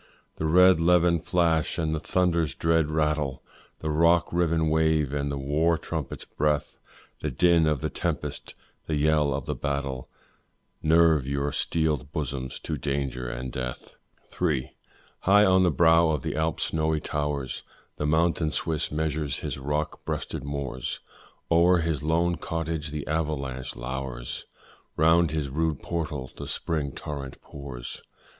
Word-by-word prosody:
The 80 - -1
red 90 +2 +6
levin 85 0 +4
flash 85 -1 +1
and 80 -2 0
the 80 - -1
thunder's 85 -5 +1
dread 80 +1 +2
rattle, 75 -3 0 0.4
The 80 - -1
rock 85 +3 +3
riven 85 -2 +2
wave 80 -3 +2
and 70 0 -1
the 70 - -3
war 75 +5 +1
trumpet's - - -5
breath, 75 0 -1 0.4
The - - -2
din 85 -3 +4
of 75 -4 +1
the - - -1
tempest, - - -3 0.3
the 80 - 0
yell 75 0 +3
of 70 -1 -2
the - - -2
battle, 70 -3 -3 0.7
Nerve 80 -3 +4
your 70 +1 -1
steeled 75 -4 0
bosoms 70 -5 -3
to 75 -3 -3
danger 70 -3 -2
and 65 +1 -5
death. 65 -1 -5 0.5
III. 70 -7 0 0.5
High 105 +2 +5
on 95 -1 +5
the 90 - +4
brow 80 +1 +5
of 75 -5 -1
the - - -2
Alps' 80 +1 0
snowy 80 -1 0
towers 75 -3 -3 0.4
The 75 - -1
mountain 80 +1 +2
Swiss 80 0 -1
measures 75 -2 -1
his - - -4
rock 75 +3 -2
breasted - - -4
moors, 70 -3 -4 0.5
O'er 85 +2 +5
his 80 -4 -1
lone 85 +2 +1
cottage 80 -1 -3
the 75 -1 -4
avalanche 70 -5 -2
lowers, - - -5 0.5
Round 80 +1 +4
its 75 -2 -1
rude 75 +2 -1
portal 75 -6 -3
the - - -7
spring 75 -4 -2
torrent 70 -2 -6
pours. 70 -4 -8
75 Hz, 145 wpm, -26 LUFS, 70-80 Hz, 0.7 s, red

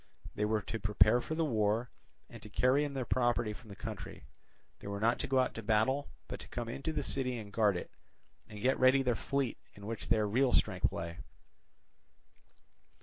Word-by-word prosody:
They 105 - 0
were 105 -1 0
to 115 - -4
prepare 105 +3 +4
for 160 - -4
the 165 0 +1
war, 110 -2 +1 0.4
and - - -12
to 105 - -9
carry 130 +6 +3
in 145 -1 -4
their 130 -2 -2
property 120 -3 +1
from 110 +1 -14
the 100 - -9
country. 105 - -7 0.5
They - - -9
were 100 0 -3
not 115 +3 +2
to - - -2
go 135 - +1
out 130 -1 +2
to 115 - -6
battle, 115 +6 +1 0.2
but - - -6
to - - -9
come 120 -1 -4
into 135 +7 -3
the 150 -2 -2
city 125 -2 -1
and 105 -3 -8
guard 105 -4 +3
it, - - -7 0.6
and 105 - -9
get 130 +1 +2
ready 130 +1 +5
their 125 -2 +2
fleet, 135 +1 -2 0.2
in 100 - -11
which 115 +1 -5
their 110 -2 +3
real 125 +5 +2
strength - - +2
lay. 85 0 -5
115 Hz, 205 wpm, -33 LUFS, 105-130 Hz, 0.6 s, ready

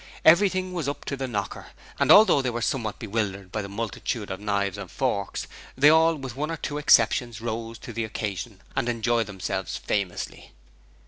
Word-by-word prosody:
Everything 185 +2 +5
was 165 -6 -2
up 145 - -6
to 140 - -2
the 135 -1 -3
knocker, 105 -5 -4 0.3
and - - +4
although 205 -9 +8
they 130 - -1
were 120 -1 -3
somewhat 115 -6 -1
bewildered 100 -4 -3
by 105 - -2
the 100 - -7
multitude 110 +1 -4
of 95 - -4
knives 100 -1 -1
and 100 -3 -7
forks, 110 -7 -2 0.3
they 145 +3 +7
all, 160 +1 +5
with 135 -4 -7
one 150 +3 -2
or 165 - -3
two 145 0 -4
exceptions, 120 -3 +4
rose 115 0 -4
to 120 - -9
the 115 +1 -2
occasion 105 -1 -5
and 120 - 0
enjoyed 115 -1 +1
themselves 95 -3 -3
famously. 100 -4 -3
115 Hz, 185 wpm, -26 LUFS, 105-140 Hz, 0.3 s, although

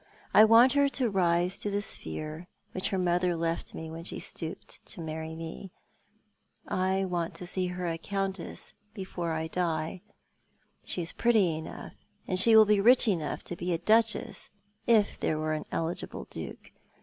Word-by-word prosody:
"I 215 - +9
want 230 +4 +7
her 285 -1 +4
to 255 -5 0
rise 180 0 +1
to 205 - 0
the 200 0 0
sphere 155 - -4 0.2
which 185 - -2
her 195 - -1
mother 180 -1 +1
left 165 0 -2
when 160 +1 -7
she - - -5
stooped 160 -2 -4
to - - -7
marry 160 0 -5
me. 165 +4 -7 1.0
I 190 +1 0
want 175 -2 -2
to 180 - -6
see 180 +1 0
her 180 0 -4
a 165 -1 -2
Countess, 195 0 -4 0.2
before 180 -4 -4
I 160 0 -2
die. 165 0 -2 0.8
She 175 - -2
is 165 - -6
pretty 215 -9 +3
enough, 160 - -8 0.3
and 185 -1 +2
she 225 +3 +7
will 220 0 +9
be 210 -1 +3
rich 240 +3 +6
enough 165 -8 -1
to 175 - -5
be 175 +1 -2
a - - +1
Duchess 225 +5 +1 0.2
— 210 - -37
if 205 - -3
there 155 - 0
were 155 0 -1
an 155 - -3
eligible 165 +1 -3
Duke. - - -8
180 Hz, 175 wpm, -29 LUFS, 165-200 Hz, 1.0 s, I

